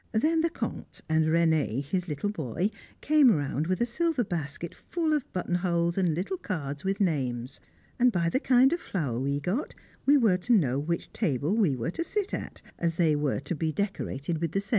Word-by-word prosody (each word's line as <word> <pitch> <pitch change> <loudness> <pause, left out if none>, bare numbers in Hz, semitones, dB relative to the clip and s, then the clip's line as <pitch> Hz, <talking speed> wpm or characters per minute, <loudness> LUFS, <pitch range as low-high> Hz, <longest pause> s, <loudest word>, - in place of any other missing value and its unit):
Then 315 +9 +2
the 335 - +2
Comte - - -6
and 160 0 +2
René, 160 -6 +2
his 180 +5 -2
little 155 +6 -2
boy, 170 - -2 0.3
came 300 -3 +5
round 145 - 0
with 185 0 0
a - - +4
silver 300 +2 0
basket 165 -3 -4
full 325 -3 -2
of 295 -4 -1
buttonholes 175 -1 0
and 180 -5 +1
little 190 - -2
cards 145 - -4
with 195 +2 -1
names, 130 - -1 0.4
and 250 0 +5
by 170 -5 +1
the 255 - +1
kind 260 +2 +4
of 345 - -1
flower 140 - -2
we 140 +2 0
got 195 - -2 0.3
we 290 +1 +7
were 220 -8 +4
to 185 +7 +1
know 140 - +3
which 170 +4 -3
table 155 - 0
we 190 -12 +3
were 120 +6 -2
to 335 - -3
sit 405 +2 -2
at, - - -5 0.2
as 165 -1 0
they 165 -3 +3
were 145 -2 0
to 175 - -4
be 160 0 -1
decorated 170 -5 -3
with 165 -2 -1
the 195 - +1
same. 200 - -9
175 Hz, 205 wpm, -28 LUFS, 150-220 Hz, 0.4 s, we